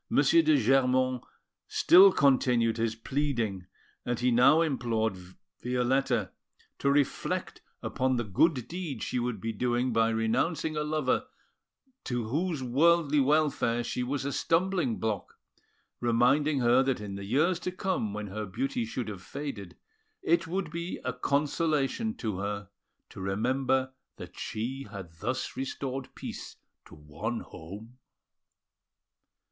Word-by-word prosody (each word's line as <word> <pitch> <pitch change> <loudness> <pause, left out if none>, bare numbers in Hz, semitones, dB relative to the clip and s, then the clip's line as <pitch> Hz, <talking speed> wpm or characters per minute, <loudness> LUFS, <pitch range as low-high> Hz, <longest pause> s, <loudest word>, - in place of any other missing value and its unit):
de 155 +2 +5
Germont 130 0 +2 0.4
still 190 +3 +7
continued 125 -6 +3
his 115 -1 0
pleading; 115 -7 -2 0.4
and 120 -1 -2
he 125 0 +2
now 135 +7 +6
implored 115 -8 0 0.5
Violetta 125 -3 0 0.5
to 140 - +1
reflect 140 -1 0 0.2
upon 130 0 0
the 120 - 0
good 125 - +1
deed 165 -9 -5
she 125 - -1
would 120 -3 -2
be 115 +3 -3
doing 120 +2 0
by 115 0 +3
renouncing 145 +9 0
a 150 - 0
lover 150 - 0 0.8
to 120 -3 -2
whose 155 +1 -1
worldly 150 +3 +3
welfare 140 -4 +2
she 125 - -3
was 135 +2 -2
a 140 - -1
stumbling 165 - +1
block, 110 -2 -3 0.6
reminding 125 +5 +2
her 120 +2 +5
that 135 -3 0
in 105 -2 -6
the 100 0 -6
years 155 - +2
to 180 - -3
come, 185 - -2
when 105 +1 -4
her 105 +1 -5
beauty 130 +6 -2
should 115 +1 -4
have 100 -4 -6
faded, 100 - -7 0.5
it 170 0 +2
would 175 -1 -3
be 170 +2 -4
a - - -1
consolation 150 +8 0
to 105 -5 -3
her 100 -1 -4 0.4
to - - -9
remember 130 +6 0 0.2
that - - -10
she 130 +5 -4
had 95 -6 -8
thus 130 +8 -3
restored 135 0 -4
peace - - -7 0.3
to - - -14
one 75 +11 -5
home. 105 +9 -11
130 Hz, 135 wpm, -29 LUFS, 115-145 Hz, 0.8 s, still